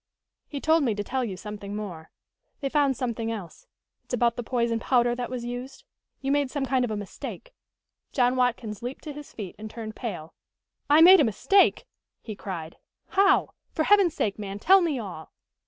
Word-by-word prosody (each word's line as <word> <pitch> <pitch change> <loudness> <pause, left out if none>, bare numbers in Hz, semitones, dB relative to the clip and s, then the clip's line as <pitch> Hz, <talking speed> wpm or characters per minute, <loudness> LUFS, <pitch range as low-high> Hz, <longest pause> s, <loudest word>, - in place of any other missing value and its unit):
"He 285 - -5
told 320 +3 +3
me 230 -6 +1
to 205 - -3
tell 260 +5 -2
you 200 -6 -4
something 205 0 -7
more. 180 -7 -6 0.5
They 275 - -2
found 280 -3 +2
something 230 -2 -2
else. 220 - -8 0.4
It's - - -3
about 235 -1 +2
the - - -3
poison 235 -1 0
powder 240 0 +2
that 245 0 -4
was 245 -2 -5
used. 250 - -6 0.4
You 270 0 -1
made 285 -2 +2
some 280 0 -2
kind 260 -1 +1
of 245 - -1
a 215 - -2
mistake 205 - -8 0.3
" - - -58
John 250 -1 +2
Watkins 245 -4 -1
leaped 245 +3 -6
to 300 - -6
his 295 0 -10
feet 200 -4 -7
and 215 0 -7
turned 220 -1 -7
pale. 175 -10 -6 0.6
"I 300 +2 +7
made 370 +3 +9
a - - +6
mistake?" 380 - +3 0.4
he 215 - -6
cried. 170 -5 -7 0.3
"How? 390 0 +3 0.2
For 315 - +1
Heaven's 395 -2 +4
sake, 205 0 -1
man, 200 -1 -5
tell 380 - +6
me 325 -6 0
all!" 185 -9 -8
245 Hz, 195 wpm, -26 LUFS, 210-280 Hz, 0.6 s, made